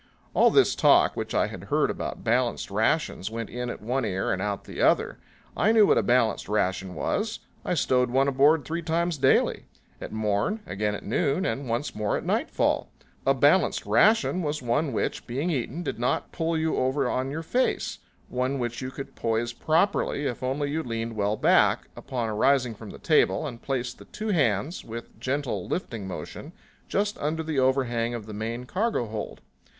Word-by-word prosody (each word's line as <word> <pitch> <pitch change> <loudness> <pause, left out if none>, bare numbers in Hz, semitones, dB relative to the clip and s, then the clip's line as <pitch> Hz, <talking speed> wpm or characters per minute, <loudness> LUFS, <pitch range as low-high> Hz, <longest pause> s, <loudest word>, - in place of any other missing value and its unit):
All - - +5
this - - +4
talk - - +4
which - - -4
I - - +3
had - - -8
heard - - +1
about - - -5
balanced 120 -2 0
rations 110 - 0
went 115 0 -5
in 125 0 -4
at 125 - -7
one 125 +4 0
ear 95 0 -1
and 95 - -3
out 100 0 -2
at - - -29
the - - -6
other. - - +2 0.4
I 220 - +3
knew 220 -2 +6
what - - +4
a - - +3
balanced 120 -5 +1
ration 95 -3 -1
was. 220 +1 -1 0.3
I 180 - -1
stowed 125 -4 +2
one 135 +3 +2
aboard 140 +3 +4
three 165 +2 -3
times 170 -1 -1
daily 130 0 +3 0.4
at - - -6
morn, 110 - 0
again 105 +1 -2
at - - -8
noon 145 - 0
and 135 -6 -2
once 120 +6 -1
more 105 -1 -1
at - - -6
nightfall. - - 0 0.4
A 135 - +5
balanced 145 +8 +3
ration 215 -4 +3
was 150 -2 -2
one 135 +5 0
which, - - -2
being 140 +9 -1
eaten, 145 +4 -2
did - - -4
not 120 - -1
pull 165 -1 -1
you 160 0 0
over 130 +1 +1
on 130 +2 -1
your 160 +4 -4
face; 250 +10 0 0.3
one 130 +2 -1
which 120 -1 -3
you 130 - -3
could 135 +1 -8
poise 115 +1 -1
properly 155 0 +1
if 125 - -3
only 140 +3 -1
you 160 +2 -1
leaned 115 -4 -4
well 105 0 0
back, - - +3
upon 120 -3 -3
arising 120 +3 +2
from 110 0 -10
the - - -9
table, 155 0 +2
and 120 -5 -6
placed 130 -3 -3
the - - -12
two 215 +1 -5
hands, 145 - +1
with 115 +1 -7
a - - -24
gentle 130 -8 -2
lifting 115 - -4
motion, 95 - -7 0.3
just 205 +1 -1
under 160 +2 -1
the 155 -3 -1
overhang 120 -3 +1
of 110 -3 -6
the 110 - -8
main 115 +4 -4
cargo 210 - 0
hold. 110 -1 -6
130 Hz, 195 wpm, -26 LUFS, 115-155 Hz, 0.4 s, knew